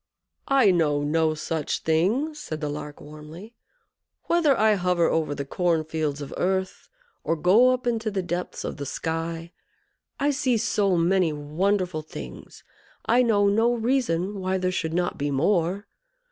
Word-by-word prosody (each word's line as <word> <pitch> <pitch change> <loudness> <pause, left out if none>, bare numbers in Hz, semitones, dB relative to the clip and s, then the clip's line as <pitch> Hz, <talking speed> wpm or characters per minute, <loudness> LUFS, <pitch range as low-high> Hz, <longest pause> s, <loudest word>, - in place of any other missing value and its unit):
"I 265 -7 +5
know 150 -5 +1
no 155 +1 +1
such 155 -1 -3
thing," 200 - +1
said 160 - -6
the 150 -1 -3
Lark, 150 0 -7
warmly. 155 +8 -11 0.7
"Whether 320 -6 +2
I 215 0 +4
hover 180 -3 +1
over 155 -3 0
the 140 - -4
corn 170 +2 0
fields 155 -2 -3
of 140 - -8
earth, 190 0 -2 0.3
or 165 - 0
go 190 +11 +5
up 255 0 0
into 225 -2 0
the 195 -3 -2
depths 175 +1 -4
of - - -5
the 140 -1 -5
sky, 165 +2 -4 0.7
I 290 +1 +2
see 265 -4 +1
so 200 -3 +1
many 175 0 +2
wonderful 175 +4 -1
things, 155 - -10 0.4
I 245 +2 +4
know 210 -4 +3
no 225 +4 +3
reason 220 -6 0
why 190 0 -1
there 185 0 -1
should 165 -3 -2
not 175 -2 -1
be 145 +1 -1
more. 175 +6 +1
180 Hz, 160 wpm, -25 LUFS, 160-210 Hz, 0.7 s, I